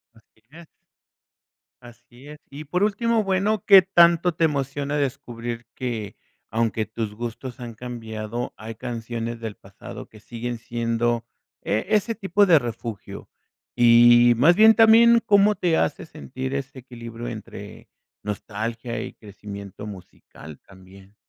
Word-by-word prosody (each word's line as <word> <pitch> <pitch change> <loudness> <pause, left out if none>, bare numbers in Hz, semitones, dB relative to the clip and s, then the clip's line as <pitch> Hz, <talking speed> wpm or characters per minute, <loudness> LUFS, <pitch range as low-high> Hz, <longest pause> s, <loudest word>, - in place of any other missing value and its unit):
Así 110 0 -27
es. 165 +2 -13 1.1
Así 120 +2 -16
es, 150 0 -10
y 145 +2 -9
por 180 +6 -1
último, 220 +2 +1
bueno, 195 +1 0
¿qué 195 -2 +9
tanto 170 -2 +4
te 165 - -1
emociona 145 0 -2
descubrir 120 -4 -4
que, 115 -5 -5 0.4
aunque 110 -1 0
tus 110 -1 -5
gustos 120 +2 -7
han 120 -2 -7
cambiado, 115 -1 -6
hay 110 +1 -9
canciones 115 -1 -5
del 110 -2 -6
pasado 95 0 -11
que 110 - -17
siguen 120 +2 -6
siendo 115 0 -1 0.4
e 105 +2 -1
ese 215 +2 +1
tipo 200 -1 +2
de 170 -5 +6
refugio, 115 -4 -7 0.5
y 120 0 +6
más 165 +8 +5
bien 220 +2 +7
también 230 +1 +6
cómo 205 -1 +4
te 170 -4 +1
hace 150 - -1
sentir 130 -4 -7
ese 135 -1 -5
equilibrio 120 -2 -9
entre 110 -3 -9 0.3
nostalgia 110 +3 -5
y - - -7
crecimiento 100 -1 -10
musical 85 -6 -12
también? 95 +1 -18
120 Hz, 135 wpm, -23 LUFS, 115-160 Hz, 1.1 s, qué